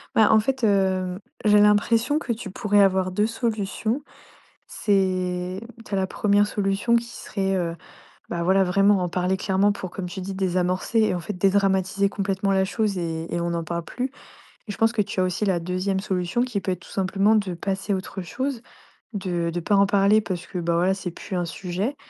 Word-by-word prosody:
Bah, 220 Hz, -, +5 dB
en 220 Hz, -, +6 dB
fait, 260 Hz, +3 st, -2 dB
hem, 190 Hz, -3 st, +1 dB, 0.2 s
j'ai 210 Hz, -1 st, +5 dB
l'impression 225 Hz, +7 st, +3 dB
que 240 Hz, -, -4 dB
tu 225 Hz, -3 st, -4 dB
pourrais 205 Hz, +1 st, +1 dB
avoir 190 Hz, -1 st, +3 dB
2 210 Hz, +3 st, +1 dB
solutions. 225 Hz, +1 st, -2 dB, 0.7 s
C'est 185 Hz, -2 st, 0 dB, 0.2 s
tu -, -, -15 dB
as -, -, +2 dB
la 190 Hz, -, +1 dB
première 205 Hz, +1 st, +2 dB
solution 205 Hz, +3 st, +1 dB
qui 235 Hz, -, 0 dB
serait, 195 Hz, -4 st, -3 dB
heu, 170 Hz, -2 st, -2 dB, 0.5 s
bah, 170 Hz, -1 st, -3 dB
voilà, 190 Hz, +2 st, +4 dB
vraiment 195 Hz, +2 st, +4 dB
en 180 Hz, -, 0 dB
parler 180 Hz, +2 st, 0 dB
clairement 195 Hz, +2 st, +2 dB
pour, 185 Hz, -3 st, -6 dB
comme 180 Hz, -2 st, -5 dB
tu 190 Hz, -, -6 dB
dis, 190 Hz, +1 st, -5 dB
désamorcer 185 Hz, +3 st, 0 dB
et 190 Hz, -, +1 dB
en 175 Hz, -, -3 dB
fait 210 Hz, -, -5 dB
dédramatiser 195 Hz, 0 st, +2 dB
complètement 195 Hz, 0 st, -1 dB
la 190 Hz, 0 st, +3 dB
chose 205 Hz, -1 st, -1 dB
et 165 Hz, -1 st, -4 dB
et 170 Hz, -, 0 dB
on 170 Hz, 0 st, -1 dB
n'en 170 Hz, -1 st, -2 dB
parle 170 Hz, +1 st, -4 dB
plus. 255 Hz, +1 st, -4 dB, 0.6 s
Et -, -, -3 dB
je -, -, -7 dB
pense 225 Hz, 0 st, +3 dB
que 210 Hz, -3 st, +1 dB
tu 195 Hz, -, -5 dB
as -, -, +4 dB
aussi 185 Hz, +3 st, -1 dB
la 185 Hz, -3 st, +1 dB
2ème 185 Hz, +3 st, -1 dB
solution 190 Hz, +3 st, -1 dB
qui 245 Hz, -5 st, -1 dB
peut 185 Hz, -, -2 dB
être 180 Hz, -, -3 dB
tout -, -, -15 dB
simplement 195 Hz, +3 st, +2 dB
de 195 Hz, -4 st, 0 dB
passer 195 Hz, +3 st, -2 dB
à -, -, +2 dB
autre 190 Hz, 0 st, -5 dB
chose, 260 Hz, +5 st, -3 dB, 0.5 s
de 175 Hz, -4 st, -2 dB
de 175 Hz, -, -2 dB
pas 200 Hz, +4 st, +1 dB
en 200 Hz, 0 st, +5 dB
parler 200 Hz, +2 st, +4 dB
parce 175 Hz, -4 st, -5 dB
que, 180 Hz, -, -6 dB
bah, 170 Hz, -1 st, 0 dB
voilà, 185 Hz, +3 st, +2 dB
c'est 185 Hz, -3 st, -5 dB
plus 185 Hz, -, -7 dB
un 175 Hz, -1 st, 0 dB
sujet. 190 Hz, -, -3 dB
195 Hz, 210 wpm, -24 LUFS, 180-205 Hz, 0.7 s, en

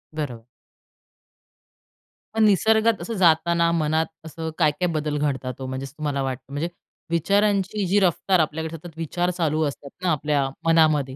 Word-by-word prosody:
बरोबर. 125 Hz, -6 st, -5 dB, 1.9 s
पण 220 Hz, 0 st, +2 dB
निसर्गात 220 Hz, +2 st, +3 dB
असं 230 Hz, -, -4 dB
जाताना, 170 Hz, -1 st, +3 dB
मनात 160 Hz, 0 st, +1 dB, 0.2 s
असं 160 Hz, 0 st, -5 dB
काय-काय 155 Hz, +4 st, +2 dB
बदल 150 Hz, -1 st, -1 dB
घडतात 135 Hz, -3 st, -1 dB
हो? 130 Hz, -, -5 dB
म्हणजे 130 Hz, +1 st, -4 dB
तुम्हाला 145 Hz, 0 st, -3 dB
वाटतं, 130 Hz, -1 st, -4 dB
म्हणजे 160 Hz, +4 st, -2 dB, 0.4 s
विचारांची 200 Hz, +3 st, +1 dB
जी 200 Hz, +3 st, +3 dB
रफ्तार 185 Hz, 0 st, +2 dB
आपल्याकडे 160 Hz, +1 st, -1 dB
सतत 165 Hz, 0 st, -12 dB
विचार 175 Hz, +2 st, -1 dB
चालू 160 Hz, -3 st, 0 dB
असतात 140 Hz, 0 st, -5 dB
ना 180 Hz, -, +2 dB
आपल्या 145 Hz, -2 st, +1 dB, 0.2 s
मनामध्ये, 155 Hz, -5 st, +3 dB
160 Hz, 140 wpm, -23 LUFS, 145-180 Hz, 1.9 s, निसर्गात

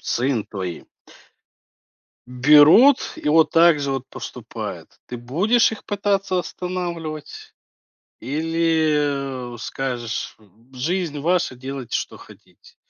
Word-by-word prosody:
сын 125 Hz, -3 st, -1 dB
твои 95 Hz, -4 st, -6 dB, 1.4 s
берут 150 Hz, -, +6 dB
и -, -, -4 dB
вот 160 Hz, +1 st, +4 dB
так 165 Hz, -2 st, +5 dB
же 140 Hz, -1 st, -2 dB
вот 135 Hz, -1 st, -3 dB
поступают. -, -, -8 dB
Ты 125 Hz, -, -6 dB
будешь 185 Hz, -, +2 dB
их 220 Hz, -, -9 dB
пытаться 200 Hz, -2 st, -1 dB
останавливать? 175 Hz, -4 st, -6 dB, 0.7 s
Или, 150 Hz, -4 st, -1 dB
э, -, -, -10 dB
скажешь: 120 Hz, -2 st, -4 dB, 0.4 s
"Жизнь 155 Hz, +3 st, -2 dB
ваша, 175 Hz, -2 st, 0 dB
делайте, 130 Hz, -1 st, -6 dB
что -, -, -4 dB
хотите"? -, -, -18 dB
150 Hz, 100 wpm, -21 LUFS, 130-175 Hz, 1.4 s, берут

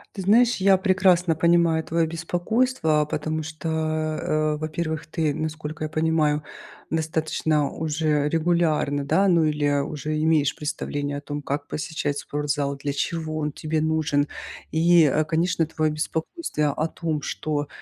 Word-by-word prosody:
Ты 190 Hz, -, -4 dB
знаешь, 235 Hz, +5 st, +5 dB
я 190 Hz, 0 st, +5 dB
прекрасно 185 Hz, -3 st, +3 dB
понимаю 170 Hz, -1 st, +3 dB
твое 165 Hz, 0 st, 0 dB
беспокойство, 175 Hz, -, 0 dB
потому 155 Hz, +1 st, -3 dB
что, 160 Hz, +1 st, -5 dB
э, 155 Hz, -1 st, 0 dB
во-первых, 155 Hz, 0 st, -3 dB
ты, 155 Hz, -2 st, -1 dB
насколько 155 Hz, 0 st, -4 dB
я 155 Hz, -, -2 dB
понимаю, 155 Hz, -2 st, +1 dB, 0.5 s
достаточно 160 Hz, -2 st, 0 dB
уже 155 Hz, -2 st, 0 dB
регулярно, 160 Hz, -4 st, +1 dB
да, 195 Hz, +7 st, +3 dB
ну, 170 Hz, -3 st, +4 dB
или 145 Hz, -2 st, +1 dB
уже 155 Hz, +1 st, -3 dB
имеешь 155 Hz, -3 st, +2 dB
представление 145 Hz, -1 st, -3 dB
о -, -, -6 dB
том, 145 Hz, 0 st, -5 dB
как 145 Hz, +1 st, -3 dB
посещать 150 Hz, -2 st, -3 dB
спортзал, 145 Hz, -1 st, -2 dB
для 140 Hz, 0 st, -3 dB
чего 155 Hz, +1 st, -2 dB
он 150 Hz, -1 st, -1 dB
тебе 155 Hz, +1 st, -2 dB
нужен, 155 Hz, -2 st, +1 dB, 0.4 s
и, 165 Hz, +1 st, +5 dB
э, 150 Hz, +2 st, +3 dB
конечно, 165 Hz, 0 st, +1 dB
твое 155 Hz, -1 st, 0 dB
беспокойство 155 Hz, -, -2 dB
о 155 Hz, +2 st, -1 dB
том, 160 Hz, -3 st, -3 dB
что, 145 Hz, 0 st, -3 dB
155 Hz, 140 wpm, -24 LUFS, 150-165 Hz, 0.5 s, знаешь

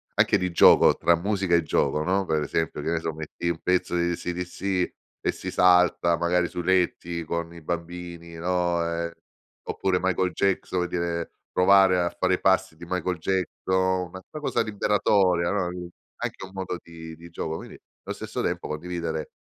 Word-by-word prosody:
Anche -, -, +4 dB
di 90 Hz, -1 st, -2 dB
gioco, 85 Hz, -, +7 dB
tra 85 Hz, -, +3 dB
musica 95 Hz, 0 st, +1 dB
e 85 Hz, -, +3 dB
gioco, 75 Hz, 0 st, +1 dB
no, 95 Hz, +3 st, +1 dB
per 80 Hz, -3 st, 0 dB
esempio, 75 Hz, +2 st, -2 dB
che -, -, -2 dB
ne 85 Hz, -, +1 dB
so, 80 Hz, 0 st, -3 dB
metti 80 Hz, +2 st, -4 dB
un 85 Hz, -2 st, -2 dB
pezzo 90 Hz, -1 st, +1 dB
di 85 Hz, 0 st, +1 dB
AC/DC 90 Hz, +2 st, -2 dB, 0.3 s
e -, -, +1 dB
si -, -, -6 dB
salta 90 Hz, -1 st, +4 dB
magari 85 Hz, +1 st, +1 dB
sui 90 Hz, -, -5 dB
letti 85 Hz, -2 st, +1 dB
con 85 Hz, +1 st, -3 dB
i 85 Hz, -, -11 dB
bambini, 85 Hz, +1 st, -6 dB
no, 90 Hz, 0 st, 0 dB
uhm, 85 Hz, 0 st, -2 dB, 0.6 s
oppure 95 Hz, -1 st, 0 dB
Michael 95 Hz, 0 st, +1 dB
Jackson, 95 Hz, -1 st, 0 dB
per 90 Hz, -, -1 dB
dire, 85 Hz, -1 st, -2 dB, 0.2 s
provare 95 Hz, 0 st, +5 dB
a 85 Hz, 0 st, +1 dB
fare 95 Hz, +1 st, +1 dB
i -, -, -7 dB
passi 95 Hz, -2 st, +2 dB
di 85 Hz, +2 st, -11 dB
Michael 90 Hz, 0 st, -2 dB
Jackson, 95 Hz, +1 st, 0 dB
una 95 Hz, +2 st, -9 dB
una 155 Hz, -, -7 dB
cosa -, -, +1 dB
liberatoria, 100 Hz, -4 st, +2 dB
no, 100 Hz, -3 st, 0 dB
uhm, 90 Hz, 0 st, -6 dB, 0.3 s
anche -, -, -5 dB
un 95 Hz, -, -14 dB
modo 95 Hz, -2 st, -4 dB
di 80 Hz, -1 st, -10 dB
di 85 Hz, +2 st, -13 dB
gioco, 80 Hz, -1 st, -4 dB
quindi -, -, -10 dB, 0.3 s
allo -, -, -5 dB
stesso -, -, -4 dB
tempo -, -, -2 dB
condividere 85 Hz, 0 st, -4 dB
90 Hz, 180 wpm, -26 LUFS, 85-95 Hz, 0.6 s, gioco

